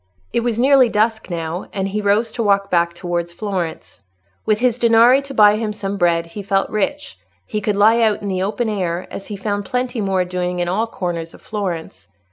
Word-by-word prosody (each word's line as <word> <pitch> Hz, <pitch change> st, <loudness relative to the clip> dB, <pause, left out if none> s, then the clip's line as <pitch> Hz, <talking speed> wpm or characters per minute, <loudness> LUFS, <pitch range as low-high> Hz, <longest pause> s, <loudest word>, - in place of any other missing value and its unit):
It -, -, +2 dB
was 235 Hz, -1 st, -1 dB
nearly 260 Hz, 0 st, +5 dB
dusk 220 Hz, 0 st, 0 dB
now, 170 Hz, 0 st, -4 dB
and 195 Hz, -1 st, -2 dB
he 210 Hz, +2 st, -2 dB
rose 205 Hz, +3 st, +1 dB
to 235 Hz, -, -4 dB
walk 200 Hz, -2 st, +1 dB
back 170 Hz, -1 st, +2 dB
towards 175 Hz, -1 st, -3 dB
Florence. 180 Hz, -, -5 dB, 0.5 s
With 215 Hz, -, +3 dB
his 245 Hz, +1 st, +1 dB
danari 235 Hz, +3 st, +5 dB
to 275 Hz, -, -8 dB
buy 210 Hz, -1 st, +6 dB
him 215 Hz, -1 st, -2 dB
some 200 Hz, -1 st, -4 dB
bread, 170 Hz, -2 st, +2 dB
he 170 Hz, +5 st, -8 dB
felt 195 Hz, 0 st, 0 dB
rich: 195 Hz, -, -2 dB, 0.3 s
he 210 Hz, -, -3 dB
could 210 Hz, 0 st, 0 dB
lie 220 Hz, +3 st, +4 dB
out 215 Hz, -2 st, +1 dB
in -, -, -3 dB
the 185 Hz, -2 st, -1 dB
open 210 Hz, +5 st, -1 dB
air, 180 Hz, -4 st, -2 dB
as 195 Hz, -, -7 dB
he 210 Hz, -, -5 dB
found 205 Hz, 0 st, -3 dB
plenty 250 Hz, 0 st, -2 dB
more 190 Hz, -2 st, 0 dB
doing 180 Hz, 0 st, -3 dB
in 175 Hz, 0 st, -1 dB
all 210 Hz, +6 st, 0 dB
corners 170 Hz, -6 st, -4 dB
of -, -, -17 dB
Florence. 185 Hz, -, -5 dB
205 Hz, 210 wpm, -19 LUFS, 180-220 Hz, 0.5 s, buy